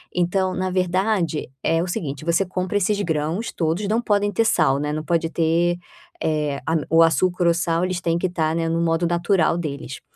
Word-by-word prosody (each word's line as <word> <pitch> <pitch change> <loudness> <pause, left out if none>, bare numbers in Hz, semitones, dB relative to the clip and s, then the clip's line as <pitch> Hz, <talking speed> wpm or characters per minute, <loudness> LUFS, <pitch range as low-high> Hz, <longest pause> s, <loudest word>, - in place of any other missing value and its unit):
então 185 +1 +1
na 185 0 -1
verdade 180 -4 0
é 165 +1 +2
o 185 - -4
seguinte, 150 -4 -4
você 170 +3 +2
compra 185 +2 -2
esses 205 +1 +1
grãos 160 +5 -2
todos, 170 +5 -1
não 225 +3 +1
podem 205 -2 +1
ter 225 +4 +1
sal, 150 -9 +3
né, 150 0 -2
não 155 +1 -3
pode 165 0 0
ter, 170 +1 +1 0.4
eh, 150 -2 0
a 160 - 0
o 165 +1 +6
açúcar 180 +2 +2
ou 170 - +5
sal, 170 +1 0
eles 185 -1 -3
têm 170 -1 0
que 180 - -2
estar, 160 -3 -1
né, 165 0 0
no 165 +1 0
modo 165 +1 +1
natural 175 0 +2
deles, 145 -4 -5
170 Hz, 200 wpm, -22 LUFS, 160-185 Hz, 0.4 s, o